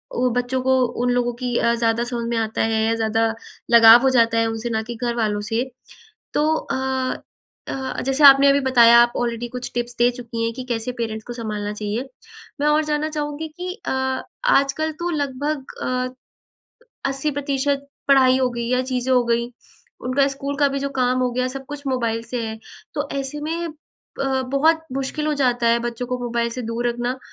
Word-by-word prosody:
वो 250 +1 +2
बच्चों 250 +1 -1
को 260 0 +3 0.3
उन 250 - +2
लोगों 245 0 +1
की 245 -1 -1
अ, 235 - +2
ज़्यादा 230 0 +1
समझ 240 -1 -3
में 235 - -1
आता 220 -1 -1
है 220 0 +1
या 225 - +2
ज़्यादा 225 0 +1 0.4
लगाव 230 0 +9
हो 265 - +4
जाता 230 -3 +3
है 230 - +2
उनसे 225 +1 -3
ना 220 -1 0
कि 240 - -4
घरवालों 225 -4 0
से। 230 +2 +1 0.7
तो 295 - +2
अ, 275 - -3 0.9
अ, 265 -1 -4
जैसे 270 +2 +1
आपने 275 0 +9
अभी 280 - +4
बताया 235 -2 +7
आप 240 0 +3
ऑलरेडी 240 0 -2
कुछ 250 - -5
टिप्स 240 0 -3
दे 240 - +5
चुकी 235 -2 -5
हैं 230 - -2
कि 255 +2 -6
कैसे 235 +1 -2
पेरेंट्स 220 -1 -3
को 240 - -5
संभालना 210 -3 -4
चाहिए। 215 +5 -4 0.5
मैं 295 - +2
और 300 +1 +3
जानना 300 +1 -1
चाहूँगी 300 0 -4
कि 360 +3 -6
अ, - - 0 0.6
आजकल 295 - +2
तो 350 - 0
लगभग 285 -1 -2 0.2
अ, 255 0 -2 1.0
80% 280 0 -1 0.2
पढ़ाई 260 -2 +5
हो 260 -1 +2
गई 235 -1 -4
या 250 0 +2
चीज़ें 255 0 -1
हो 250 - +5
गई 235 0 +1 0.6
उनका 275 +2 +3
स्कूल 275 +1 -4
का 290 - +4
भी 275 - -2
जो 280 - -1
काम 255 0 +2
हो 250 -1 +1
गया, 255 +1 0
सब 270 +1 -7
कुछ 290 0 -7
मोबाइल 230 -3 -1
से 245 +1 -4
है। 220 0 -6 0.4
तो - - -2
ऐसे 275 +2 -5
में 330 +3 -3 0.5
अ, 270 -1 0
बहुत 305 +5 +2
मुश्किल 275 +3 -3
हो - - +1
जाता 245 -4 +1
है 235 - +4
बच्चों 240 +1 -4
को 250 0 -2
मोबाइल 235 -1 -1
से 250 +1 -5
दूर 230 +2 -2
रखना 240 +2 -2
250 Hz, 195 wpm, -22 LUFS, 235-275 Hz, 1.0 s, लगाव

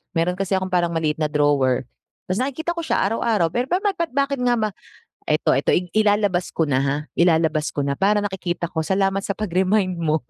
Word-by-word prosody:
Meron 180 +2 0
kasi 195 0 0
akong 185 0 -2
parang 175 -2 +1
maliit 155 -1 -1
na 155 - +1
drawer, 145 -4 +2 0.5
tapos 190 - 0
nakikita 280 +6 -2
ko 345 - -5
siya - - +1
araw-araw. 210 -3 +1
Pero 245 +7 -1
ba't 360 +6 0 0.2
ba't 335 -1 -1
bakit 280 -1 0
nga 245 -1 +2
ba, 215 -2 0 0.6
eto 155 +1 +2
eto 135 - +2 0.2
ilalabas 205 -4 +2
ko 165 - +2
na 140 -4 +1
ha, 135 +1 0 0.2
ilalabas 160 -3 +3
ko 145 - 0
na 140 0 -2
para 205 +1 +2
nakikita 175 -3 -3
ko. 160 - -2
Salamat 195 0 +1
sa 200 0 -3
pag-remind 185 -1 0
mo. 155 -3 0
185 Hz, 200 wpm, -22 LUFS, 160-210 Hz, 0.6 s, ilalabas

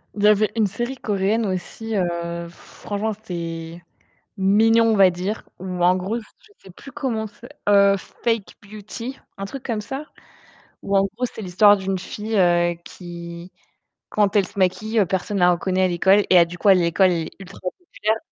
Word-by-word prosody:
Il 205 - -3
y - - +7
avait 210 0 +4
une 215 - +3
série 240 +7 -4
coréenne 210 +1 0
aussi, 205 +4 -4
heu, 170 -2 -2
franchement, 205 +5 -5
c'était 170 -5 -6 0.5
mignon, 220 +4 +4
on - - +3
va 195 -1 +7
dire, 185 +5 -4
ou 180 -1 -5
en 180 +1 +5
gros, 195 +6 -2
je 325 - -19
sais 190 - -15
plus 230 +9 -13
comment 245 -6 -2
c'est? 235 +4 -15 0.2
Heu, 200 -1 +6
Fake 225 +2 -3
Beauty. 215 +5 -8 0.2
Un 195 - -4
truc 265 +6 -8
comme 230 -4 -2
ça, 270 +7 -6 0.8
ou 200 - 0
en 195 - +3
gros, 250 - -1
c'est 235 - -5
l'histoire 205 +1 +5
d'une 190 0 -2
fille, 215 +4 -4
heu, 175 -1 +3
qui, 170 0 -9 0.6
quand 205 0 +1
elle 200 - +4
se 200 - -9
maquille, 210 +4 +2
personne 195 +2 -1
la 180 0 +5
reconnaît 185 +2 0
à - - +4
l'école 190 +3 +4
et 185 - +7
à 170 - +7
du 175 +1 -10
coup, - - -1
à 195 - +8
l'école 180 +2 +3
elle 170 -2 -1
est - - -9
ultra 195 0 -11
populaire. 215 - -2
195 Hz, 185 wpm, -22 LUFS, 180-220 Hz, 0.8 s, à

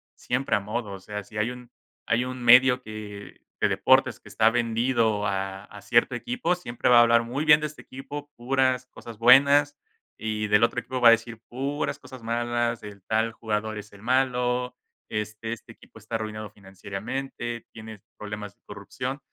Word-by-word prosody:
siempre 125 0 -1
a 105 - 0
modo, 105 +1 -4
o 95 - -8
sea, 105 +1 -6
si 105 +2 -11
hay 110 +3 0
un 125 -1 -11 0.4
hay 115 +2 +2
un 130 0 -6
medio 125 +1 +7
de 105 -2 -9 0.3
deportes - - +3
que - - -18
está 110 0 +3
vendido 115 -2 +1
a 95 0 -3
a 105 -1 -13
cierto 120 +1 +2
equipo, 235 - -1
siempre 120 -11 -2
va 120 - +7
a - - +9
hablar 115 0 +4
muy 135 +6 -3
bien 150 0 +7
de 150 - -1
este 150 - -13
equipo, 145 +2 -8
puras 130 0 +1
cosas 115 -3 -11
buenas, 140 +4 +6 0.4
y 110 -1 -2
del 105 +2 +4
otro 120 +1 +2
equipo 130 +2 -5
va 120 - +9
a - - +9
decir 115 0 0
puras 140 +4 -3
cosas 130 -3 -12
malas, 120 0 -1
el 100 -2 -10
tal 110 +2 0
jugador 110 -1 -3
es 105 0 -10
el 100 - -15
malo, 125 0 0 0.3
este 105 +1 -4
este 115 0 -11
equipo 110 - -17
está 110 +2 -6
arruinado 110 -1 -4
financieramente, 105 +5 -6
tiene 110 -2 -10 0.2
problemas 105 -2 -7
de - - -49
corrupción, 125 +7 -6
115 Hz, 180 wpm, -26 LUFS, 105-125 Hz, 0.4 s, a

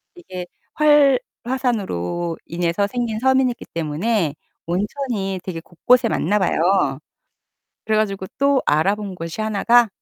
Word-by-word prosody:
이게 185 - -8 1.0
활화산으로 190 - -2
인해서 175 +4 -1
생긴 235 -2 -2
섬이기 260 -1 +2
때문에 165 +1 -1 0.3
온천이 195 +1 -2
되게 170 -3 -5
곳곳에 230 +8 +2
많나 205 +6 +1
봐요. 170 -6 +2 0.9
그래 220 0 +1
가지고 195 -3 -1
또 280 -1 +3
알아본 195 +6 +1
곳이 165 +3 -6
하나가 220 +2 +3
200 Hz, 265 characters per minute, -21 LUFS, 175-235 Hz, 1.0 s, 또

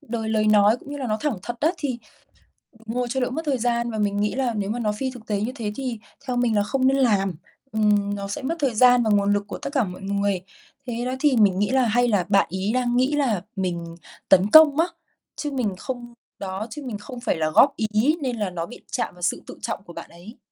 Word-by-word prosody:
đời 225 -6 -4
lời 215 -1 +1
nói 210 +1 +5
cũng 285 - -12
như 290 - -4
là 270 -3 -4
nó 215 -2 0
thẳng 290 -9 -1
thật 240 +3 -5
á, 315 - +3
thì 260 -5 -3 0.9
ngồi 245 +2 -2
cho 265 +2 -1
đỡ 250 - 0
mất 290 +6 -3
thời 280 -3 +1
gian. 235 0 0
Và 220 - -4
mình 205 -1 0
nghĩ 210 +2 0
là 255 -3 0
nếu 205 -2 -2
mà 240 +3 -2
nó 215 -2 0
phi 260 +6 -3
thực 245 -4 -12
tế 205 -2 -1
như 230 +4 -1
thế 220 -5 -3
thì 255 -4 -4 0.3
theo 250 - -1
mình 245 -3 +1
là 205 - +3
không 260 +4 +1
nên 270 +1 +3
làm. 200 -8 +2 0.4
Ừm, 205 -2 +2
nó 200 0 -5
sẽ 200 - -4
mất 295 +6 -2
thời 270 -6 0
gian 245 +1 +6
và 220 - 0
nguồn 205 -1 +3
lực 205 - 0
của - - -6
tất - - -5
cả 265 -5 +3
mọi 185 -1 -7
người. 200 -1 -1 0.5
Thế 240 0 -3
đó, 255 - -1
thì 290 -3 +3
mình 200 -4 +4
nghĩ 205 - +1
là 260 -1 +3
hay 245 +2 +2
là 205 -6 +2
bạn 195 -1 +4
ấy 190 +2 -1
đang 245 -1 +1
nghĩ 260 +3 +2
là 240 -10 +1
mình 170 -3 -3 0.3
tấn 190 +2 +5
công 315 +2 +8
á, 330 - +5 0.5
chứ 295 -2 -4
mình 235 -8 -1
không 240 +2 -6 0.3
đó, 195 +2 -4
chứ 295 - -7
mình 230 -5 -4
không 245 +4 -9
phải 240 - 0
là 155 -1 0
góp 275 - +5
ý, 220 +8 +1
nên 255 -4 -2
là 205 -3 -1
nó 170 -2 -4
bị - - -12
chạm - - -2
vào 180 - -15
sự 175 - 0
tự - - -9
trọng - - -4
của 170 - -12
bạn - - -9
ấy. 180 +7 -13
225 Hz, 265 wpm, -23 LUFS, 205-255 Hz, 0.9 s, công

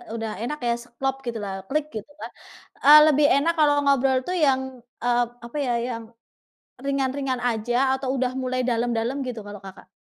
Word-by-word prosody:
udah 225 -1 -4
enak 300 +5 -4
ya, 235 - +2 0.3
klop 270 0 0
gitulah, 220 -4 -4 0.2
klik 300 +1 0
gitu 215 +6 -7
kan, - - -6 0.5
eee, 300 +2 +10
lebih 295 -1 +4
enak 320 +5 +2
kalau 295 -1 +5
ngobrol 270 -1 +3
tuh 365 - -1
yang, 265 -2 +2 0.4
eee, 245 0 +3 0.2
apa 240 +5 -7
ya, 245 - +1 0.2
yang 230 -2 -5 0.8
ringan-ringan 270 -1 -1
aja 235 +1 -1 0.2
atau 265 -1 -4
udah 255 -1 0
mulai 255 0 -1
dalam-dalam 235 +1 -1
gitu 230 -3 -5
kalau 205 -1 -9
Kakak? 190 0 -12
255 Hz, 170 wpm, -24 LUFS, 235-275 Hz, 0.8 s, eee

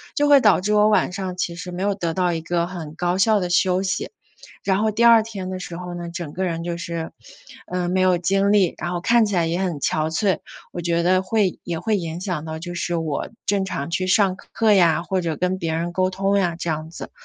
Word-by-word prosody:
就 290 -2 +2
会 285 -2 +7
导 210 -4 +4
致 210 +3 0
我 210 0 +5
晚 210 - +2
上 185 -1 -4
其 175 -1 -2
实 180 +1 -7
没 180 +2 -4
有 200 0 +1
得 170 -4 -3
到 180 -2 +1
一 165 - -3
个 170 +1 -1
很 165 -4 -7
高 180 +1 -1
效 215 +1 +4
的 180 -1 -3
休 185 +1 +2
息。 190 0 -2 0.5
然 190 -1 +1
后 220 - +2
第 230 +3 +2
2 230 -1 +8
天 195 -4 -6
的 185 - -4
时 170 -1 -7
候 180 -1 -6
呢， 175 -1 -6
整 170 -3 -6
个 190 - -2
人 170 -2 -2
就 175 0 -3
是， 170 -1 -5 0.6
嗯， 180 -1 -1
没 185 - +2
有 185 -1 +4
精 195 +3 +1
力， 195 -4 +3
然 175 +2 -3
后 175 - -2
看 230 +3 +3
起 200 - -2
来 170 -1 +2
也 170 +2 -1
很 185 -3 0
憔 155 +2 0
悴， 190 +4 +1 0.3
我 175 - -5
觉 170 0 0
得 185 +1 +3
会 190 -1 0
也 170 -2 -3
会 220 +1 0
影 165 -2 -4
响 180 -5 -3
到 160 0 -5
就 175 +2 -7
是 175 0 -2
我 160 -3 -2 0.2
正 200 -1 +1
常 165 -3 -4
去 185 +2 -1
上 190 -1 +3
课 220 +2 +1
呀， 170 -4 +4
或 185 +1 -1
者 165 -3 -2
跟 185 +1 -1
别 165 -1 -2
人 170 +1 -3
沟 185 0 +1
通 195 +1 0
呀， 175 -3 0
这 170 - -5
样 155 0 -4
子， 165 - -9
180 Hz, 270 characters per minute, -22 LUFS, 170-195 Hz, 0.6 s, 2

